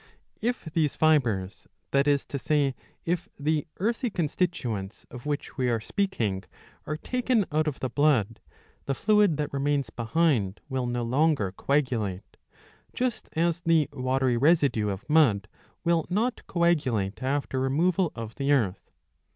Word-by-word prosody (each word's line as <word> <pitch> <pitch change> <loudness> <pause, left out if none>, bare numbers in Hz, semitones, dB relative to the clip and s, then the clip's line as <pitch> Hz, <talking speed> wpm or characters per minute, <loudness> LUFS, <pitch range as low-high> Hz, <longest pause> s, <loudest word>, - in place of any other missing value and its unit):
^ - - -26 0.4
If 240 0 -1
these 155 -4 +1
fibres, 115 -12 +1 0.2
that 140 +1 +3
is 145 -1 +2
to 140 - -4
say 145 -1 +1 0.3
if 175 +1 -1
the 150 +2 0
earthy 230 +5 0
con 175 -6 -1
stituents 120 - -2
of 125 +3 -8
which 145 -1 -3
we 125 -1 +2
are 115 -1 +1
speaking, 110 - -1 0.4
are 155 - -2
taken 250 +2 0
out 155 +1 +1
of 145 - -3
the 130 - -1
blood, 125 -7 +2 0.5
the 135 - 0
fluid 210 -5 +3
that 150 -2 -3
remains 140 -3 0
behind 115 - +1
will 130 -3 -2
no 120 0 -1
longer 130 - +2
coagulate; 115 -6 -1 0.6
just 250 -2 -2
as 170 +1 +1
the 165 -3 +3
watery 130 -2 +1
residue 135 -7 +3
of 100 0 -5
mud 130 -11 +4 0.4
will 170 -2 +2
not 225 +7 -1
coagulate 135 - +1
after 135 0 -1
removal 165 +7 +1
of 115 -1 -6
the 140 0 -1
earth. 110 -9 +1
145 Hz, 150 wpm, -27 LUFS, 120-165 Hz, 0.6 s, mud